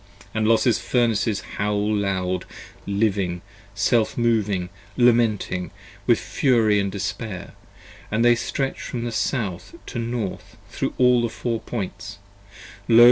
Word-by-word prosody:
And 110 -1 +1
Los's 115 +1 +4
Furnaces 115 -4 +1 0.2
howl 105 +1 +1
loud, 95 -3 -1 0.4
living, 100 -4 0 0.3
self 110 +3 +2
moving, 105 -6 +1 0.3
lamenting 115 -7 +2 0.4
With - - +5
fury 110 -6 +2
& - - -2
despair, 95 0 -5 0.3
& - - -20
they 120 +3 +5
stretch 135 +3 -2
from 120 -1 -4
South 110 - -2
to 120 - -5
North 115 -4 -4
Thro' - - -2
all 125 -1 +5
the 120 - 0
Four 115 0 -2
Points: 100 -3 -5 0.7
Lo! 115 -1 +6
110 Hz, 120 wpm, -23 LUFS, 100-120 Hz, 0.7 s, Lo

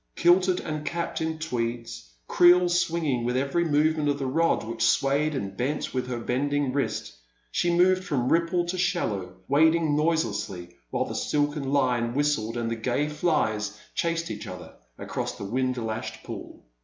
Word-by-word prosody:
Kilted 180 +1 +4
and 155 -1 -4
capped 170 +1 -3
in 160 0 -2
tweeds, 115 - -4 0.2
creel 175 0 +6
swinging 170 -7 0
with 125 +1 0
every 140 +6 +1
movement 155 -1 +2
of 140 - +1
the 140 - -3
rod 165 +3 +1
which 115 +1 -6
swayed 145 +2 +2
and 100 -7 -4
bent 140 +6 -2
with 130 -1 -2
her 125 -1 -3
bending 140 +3 0
wrist, 140 0 -2 0.4
she 175 - +1
moved 185 +2 +4
from 130 -9 -1
ripple 170 +1 +2
to 180 +1 -3
shallow, 100 - -1
wading 160 +1 +3
noise 160 +2 +2
lessly 90 -2 -5 0.2
while - - -1
the - - -6
silken 145 -2 -1
line 125 -4 +1
whistled 130 -6 0
and 115 -1 -2
the - - 0
gay 125 +6 0
flies 110 -10 0
chased 165 0 -1
each - - -6
other - - -9 0.2
across - - -4
the - - -6
wind 130 +4 -1
lashed 110 -2 -4
pool. - - -9
145 Hz, 170 wpm, -26 LUFS, 120-165 Hz, 0.4 s, creel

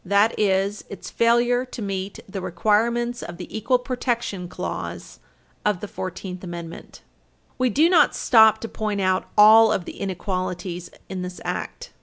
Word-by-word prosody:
That 200 +4 +3
is 200 0 +1
its 200 - -9
failure 240 +1 +3
to 255 -1 -10
meet 195 -2 -4
the 195 0 -6
requirements 230 +7 0
of 175 - -8
the 180 - -9
equal 230 +4 +2
protection 240 -7 -3
clause - - -6 0.4
of 210 -4 +1
the 210 - -6
Fourteenth 185 -1 -6
Amendment. 170 -2 -9 0.6
We 255 0 +2
do 300 +8 +4
not 340 -4 +4
stop 220 -2 +5
to 230 - -4
point 215 -2 -3
out 185 0 0
all 220 +1 +8
of 175 - -1
the - - -9
inequalities 185 -2 -4 0.2
in 190 -1 -5
this 180 0 -6
Act. - - -5
205 Hz, 155 wpm, -23 LUFS, 185-230 Hz, 0.6 s, all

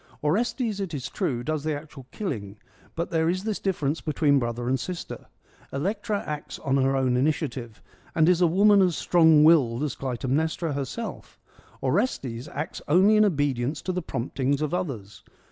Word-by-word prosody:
Orestes, 215 - 0
it 185 -5 -3
is 130 -2 -5
true, 120 -3 -2
does 155 +2 -2
the 155 -1 -1
actual 145 -3 -10
killing; 110 - -5 0.4
but 170 +1 -3
there 165 -1 +2
is 185 +2 -1
this 215 -1 -2
difference 160 -6 -1
between 145 -2 +2
brother 120 0 -3
and 130 +1 +1
sister: 180 +5 -6 0.4
Electra 200 +7 -2
acts 150 -1 -5
on 135 0 0
her 135 0 +2
own 130 -2 +1
initia 150 +5 +1
tive, 120 -4 -9 0.3
and 160 0 +4
is 180 0 +4
a 175 - +6
woman 200 +4 +5
as 180 -3 +2
strong 160 -3 +5
willed 140 -6 +4
as 145 -4 -1
Clytemnestra 140 +5 -1
herself; 140 - -6 0.4
Orestes 130 - -1
acts 150 - -5
only 190 +8 +5
in 215 - +6
obedience 145 - 0
to 185 - -1
the 180 0 -2
promptings 135 0 -2
of 155 - -2
others. 120 - -4
150 Hz, 170 wpm, -26 LUFS, 130-180 Hz, 0.4 s, a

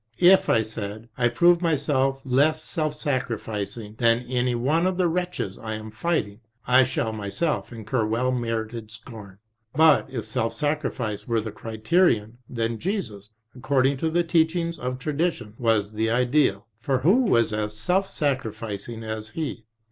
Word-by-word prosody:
If, 185 +2 +6
I 110 - +4
said, 110 +1 -7
I 120 -1 +2
prove 170 +8 +4
myself 140 -4 +1
less 145 +5 +2
self 155 -2 -2
sacrificing 115 -6 -3
than 115 0 +3
any 125 0 0
one 150 +9 +1
of 185 -1 -1
the 180 -2 +3
wretches 175 - -3
I 110 -1 -4
am 110 0 -8
fighting, 110 -5 -1 0.3
I 125 +1 +6
shall 115 -3 -2
myself 110 +11 -2
incur 110 0 -2
well 120 +4 0
merited 115 -2 -3
scorn. 110 -4 -11 0.4
But 160 -2 +5
if 120 -5 -5
self 115 +1 -2
sacrifice 135 -6 -2
were 115 -2 +1
the 110 0 -4
criterion, 115 - +1
then 115 -1 -2
Jesus, 135 - -4 0.3
according 135 +1 +1
to 160 +4 0
the 175 +2 +2
teachings 165 0 +1
of 125 +1 -3
tradition, 145 -5 -2
was 110 -4 +1
the 110 +1 -1
Ideal, 125 +3 +2
for 130 +3 0
who 205 - +4
as 115 -1 +2 0.3
self 185 - +1
sacrificing 115 - -3
as 110 0 -5
He 140 -5 -5
125 Hz, 150 wpm, -25 LUFS, 110-155 Hz, 0.4 s, If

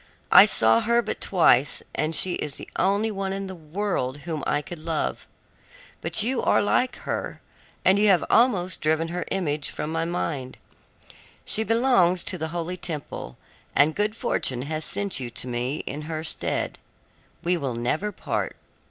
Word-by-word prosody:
I - - +10
saw 110 +1 +4
her 235 - +2
but - - -4
twice, 160 -7 +3
and 155 +1 -1
she 185 - +6
is 150 -4 -4
the - - -8
only 200 +4 +2
one 195 -1 -3
in 195 0 -3
the 190 - -6
world 155 -5 -3
whom 160 -3 -4
I 145 0 0
could 175 +1 -8
love. 160 0 -3 0.7
But 215 - +1
you 250 +2 0
are - - +3
like 250 +5 +1
her, - - -3 0.5
and 190 +2 +5
you 210 - +4
have 185 -4 +4
almost 195 -7 +2
driven 160 +1 +1
her 175 0 -3
image 150 -6 -1
from 150 +1 -4
my 165 0 -1
mind. 150 -6 -3 0.9
She 220 - +2
belongs 225 -7 +3
to 185 - -2
the 160 - -2
holy 175 +2 -4
temple, 150 - -6 0.4
and 145 +2 +4
good 210 +3 -1
fortune 125 - 0
has 155 +2 -3
sent 200 -1 -1
you 125 -2 -4
to 120 - -4
me 125 +4 -2
in 145 +3 -5
her 160 -1 -3
stead. - - -3 0.6
We 180 +1 +2
will 135 -7 -3
never 150 - -1
part. - - -3
170 Hz, 170 wpm, -25 LUFS, 150-195 Hz, 0.9 s, I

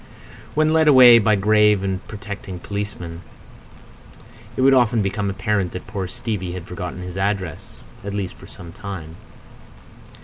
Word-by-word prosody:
When 155 +1 +3
led 160 -1 +3
away 125 -4 +9
by 105 0 +3
a - - +5
grave 105 0 +3
and 95 -1 -1
protecting 100 -2 -7
policeman, 90 -4 -6 1.4
it - - 0
would 135 0 +6
often 120 -4 +3
become 100 +1 -2
apparent 100 -2 -1
that 90 - -7
poor 100 -3 -4
Stevie 95 -2 -4
had 90 -2 -7
forgotten 90 0 -6
his 90 0 -7
address—at 100 +3 -5
least 95 -3 -3
for - - -14
a 85 -2 -11
time. 95 -5 -8
100 Hz, 145 wpm, -21 LUFS, 90-110 Hz, 1.4 s, away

